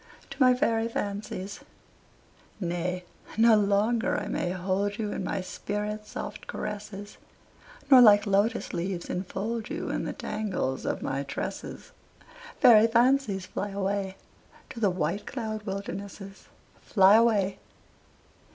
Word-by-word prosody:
TO 275 Hz, 0 st, -8 dB
MY 255 Hz, -1 st, +6 dB
FAIRY 225 Hz, -2 st, +1 dB
FANCIES 205 Hz, -2 st, -4 dB, 1.0 s
Nay, 180 Hz, 0 st, -2 dB, 0.3 s
no 225 Hz, 0 st, +6 dB
longer 210 Hz, +3 st, +2 dB
I -, -, -3 dB
may 175 Hz, -, -1 dB
hold 190 Hz, +3 st, -1 dB
you, 210 Hz, -2 st, -2 dB
In -, -, -3 dB
my 195 Hz, -, -2 dB
spirit's 210 Hz, +3 st, -4 dB
soft -, -, -7 dB
caresses, 205 Hz, -1 st, -6 dB, 0.7 s
Nor 260 Hz, -2 st, +10 dB
like 210 Hz, -2 st, +7 dB
lotus 200 Hz, +2 st, +1 dB
leaves 175 Hz, 0 st, -3 dB
enfold 210 Hz, +5 st, -3 dB
you -, -, -4 dB
In -, -, -2 dB
the -, -, -3 dB
tangles 190 Hz, -11 st, -3 dB
of -, -, -2 dB
my 135 Hz, +1 st, -2 dB
tresses. 140 Hz, 0 st, -6 dB, 0.7 s
Fairy 225 Hz, -2 st, +7 dB
fancies, 235 Hz, -4 st, +2 dB
fly 205 Hz, -, -4 dB
away 195 Hz, -1 st, -2 dB, 0.5 s
To 235 Hz, -, -8 dB
the 210 Hz, -3 st, +3 dB
white 180 Hz, +2 st, -2 dB
cloud 220 Hz, -4 st, -5 dB
wildernesses, 195 Hz, 0 st, -6 dB, 0.3 s
Fly 195 Hz, -1 st, +5 dB
away! 215 Hz, -4 st, +3 dB
205 Hz, 125 wpm, -27 LUFS, 190-220 Hz, 1.0 s, Nor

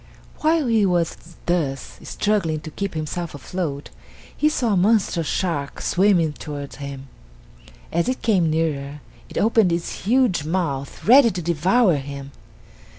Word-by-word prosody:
While 315 Hz, -1 st, +2 dB
he 225 Hz, -3 st, +3 dB
was 175 Hz, -4 st, +1 dB, 0.3 s
thus 145 Hz, -7 st, -2 dB
struggling 180 Hz, -8 st, -1 dB
to 155 Hz, -, -8 dB
keep 200 Hz, +1 st, -4 dB
himself 155 Hz, +1 st, -4 dB
afloat, 145 Hz, 0 st, -4 dB, 0.4 s
he 305 Hz, -, +2 dB
saw 245 Hz, -8 st, 0 dB
a -, -, +3 dB
monstrous 185 Hz, -4 st, +2 dB
shark 155 Hz, -7 st, -2 dB
swimming 175 Hz, -5 st, +2 dB
towards 145 Hz, -2 st, -7 dB
him. 140 Hz, -1 st, -7 dB, 0.8 s
As 170 Hz, +7 st, +1 dB
it 255 Hz, -, -3 dB
came 185 Hz, -8 st, +3 dB
nearer 150 Hz, -3 st, -2 dB, 0.3 s
it -, -, -8 dB
opened 220 Hz, -4 st, +3 dB
its 170 Hz, +2 st, -3 dB
huge 240 Hz, -, +3 dB
mouth 155 Hz, -5 st, -3 dB
ready 250 Hz, +2 st, +7 dB
to 180 Hz, -4 st, -4 dB
devour 175 Hz, +3 st, +3 dB
him. 140 Hz, 0 st, -7 dB
170 Hz, 140 wpm, -22 LUFS, 150-205 Hz, 0.8 s, ready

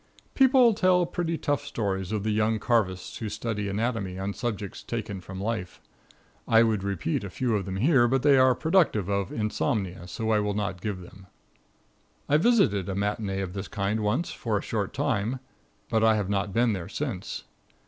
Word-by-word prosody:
People 260 Hz, -3 st, +5 dB
tell 185 Hz, -3 st, +3 dB
pretty 170 Hz, -1 st, -2 dB
tough 145 Hz, -1 st, -1 dB
stories 100 Hz, -8 st, -3 dB
of 105 Hz, -2 st, -1 dB
the 110 Hz, -, 0 dB
young 110 Hz, +1 st, +2 dB
carvists 105 Hz, -4 st, 0 dB
who 110 Hz, -, -3 dB
study 105 Hz, -2 st, -3 dB
anatomy 100 Hz, -3 st, -2 dB
on 95 Hz, +1 st, -3 dB
subjects 105 Hz, -5 st, -4 dB
taken 110 Hz, -5 st, -5 dB
from 95 Hz, +1 st, -8 dB
life. 100 Hz, -3 st, -3 dB, 0.7 s
I 115 Hz, 0 st, +6 dB
would 110 Hz, -4 st, +1 dB
repeat 100 Hz, -3 st, -2 dB
a 100 Hz, -, -5 dB
few 120 Hz, +3 st, -1 dB
of 100 Hz, -3 st, -1 dB
them 95 Hz, -1 st, -4 dB
here, 125 Hz, -, +4 dB
but 130 Hz, +1 st, +1 dB
they 145 Hz, -1 st, +6 dB
are 130 Hz, -1 st, +5 dB
productive 160 Hz, -, +2 dB
of 100 Hz, -1 st, -1 dB
insomnia, 105 Hz, -, -2 dB
so 110 Hz, +6 st, -2 dB
I 110 Hz, -, +4 dB
will 105 Hz, -1 st, -1 dB
not 100 Hz, -4 st, -3 dB
give 100 Hz, -3 st, -3 dB
them. 95 Hz, +2 st, -14 dB, 1.0 s
I 145 Hz, -, +4 dB
visited 155 Hz, -, +3 dB
a 95 Hz, -, -2 dB
matinee 100 Hz, -1 st, -1 dB
of 90 Hz, -2 st, -4 dB
this 95 Hz, -1 st, -5 dB
kind 105 Hz, +2 st, -1 dB
once 110 Hz, +11 st, 0 dB
for 110 Hz, -3 st, -2 dB
a -, -, -4 dB
short -, -, -2 dB
time, 110 Hz, +6 st, -1 dB, 0.5 s
but 110 Hz, 0 st, +1 dB
I 110 Hz, -1 st, +5 dB
have 100 Hz, -2 st, -1 dB
not 100 Hz, 0 st, 0 dB
been 115 Hz, +2 st, +2 dB
there 95 Hz, -2 st, -5 dB
since. 120 Hz, -7 st, -4 dB
105 Hz, 190 wpm, -27 LUFS, 100-120 Hz, 1.0 s, I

